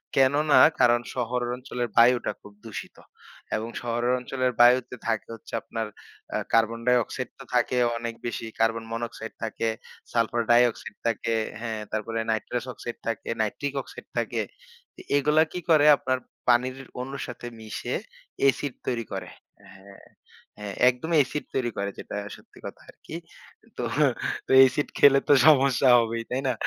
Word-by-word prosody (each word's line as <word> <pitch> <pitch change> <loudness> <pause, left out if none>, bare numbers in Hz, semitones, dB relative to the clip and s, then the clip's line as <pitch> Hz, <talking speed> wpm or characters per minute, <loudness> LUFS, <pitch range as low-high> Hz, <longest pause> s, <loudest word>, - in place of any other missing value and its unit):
কেননা 145 +3 +4 0.2
কারণ 120 0 +5
শহর 125 0 -1
অঞ্চলের 125 -1 -4
বায়ুটা 120 +1 +5
খুব 105 - -14
দূষিত। 110 -2 -8 0.6
এবং 110 +2 -3
শহরের 120 +1 0
অঞ্চলের 130 0 -1
বায়ুতে 125 +1 +5
থাকে 110 -2 -1
হচ্ছে 115 - -16
আপনার 115 -1 -4 0.5
আ - - +2 0.2
কার্বন 115 0 +3
ডাই-অক্সাইড 125 0 +1
তো - - -8
থাকে 125 +1 +2 0.2
অনেক 115 0 -4
বেশি। 115 -1 -3
Carbon 115 0 +1
monoxide 115 -1 -5
থাকে, 110 0 -1 0.4
salfar 115 0 +1
dioxide 120 -3 +2
থাকে 115 0 -1 0.3
হ্যা, 115 0 -4 0.2
তারপরে 110 +1 -2
naitrous 115 +2 -2
oxide 120 +1 -7
থাকে 115 -2 -3
naitric 135 +6 -2
oxide - - -13
থাকে। - - -1 0.6
এ - - -10
এগুলা 150 +2 +4
কি 180 - -4
করে 155 -2 +6
আপনার 130 0 -1 0.3
পানির 125 +2 +3 0.2
অনুর 135 +2 -6
সাথে 120 0 -7
মিশে 110 -1 -4 0.5
এসিড 140 0 -2
তৈরি 120 -3 -1
করে। - - -5 0.4
হ্যা, 100 0 -15 0.6
হ্যা 105 -1 -6 0.2
একদমই 160 +7 -1
এসিড 150 +3 -5
তৈরি 120 -3 0
করে 100 0 -1
যেটা - - -6 0.2
সত্যি - - -19
কথা - - -8
আরকি। - - -11 0.6
তো - - -3 0.8
এসিড 145 +3 -1
খেলে 140 -1 +7
তো - - +8
সমস্যা 135 -3 +5
হবেই, 115 0 -1
তাই 130 +2 -1
না? 130 - +2
120 Hz, 145 wpm, -26 LUFS, 115-130 Hz, 0.8 s, তো